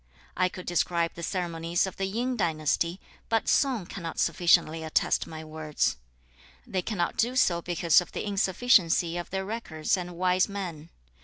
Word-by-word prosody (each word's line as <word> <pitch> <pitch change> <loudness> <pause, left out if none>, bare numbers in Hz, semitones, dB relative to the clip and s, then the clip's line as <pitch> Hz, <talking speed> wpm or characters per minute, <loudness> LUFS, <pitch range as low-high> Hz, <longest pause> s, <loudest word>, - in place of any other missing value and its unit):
I 185 0 +2
could 180 0 -9
describe 170 -1 0
the 170 - -9
ceremonies 170 -1 -1
of 190 - -7
the 195 - -1
Yin 245 +6 -1
dynasty, 170 -1 0 0.3
but 225 -1 +1
Sung 255 -9 +2
cannot 170 -3 -6
sufficiently 170 -1 +3
attest 160 - +1
my 160 0 -8
words. 155 - -1 0.7
(They 185 - -2
cannot 180 -3 -2
do 245 +3 +1
so) 175 -9 +3
because 170 -1 +3
of 175 - -9
the - - -4
insufficiency 190 -4 +2
of 175 0 -4
their 190 0 -3
records 190 -8 -1
and 175 -1 -6
wise 185 +2 +2
men. 175 -6 -6
175 Hz, 160 wpm, -27 LUFS, 165-195 Hz, 0.7 s, sufficiently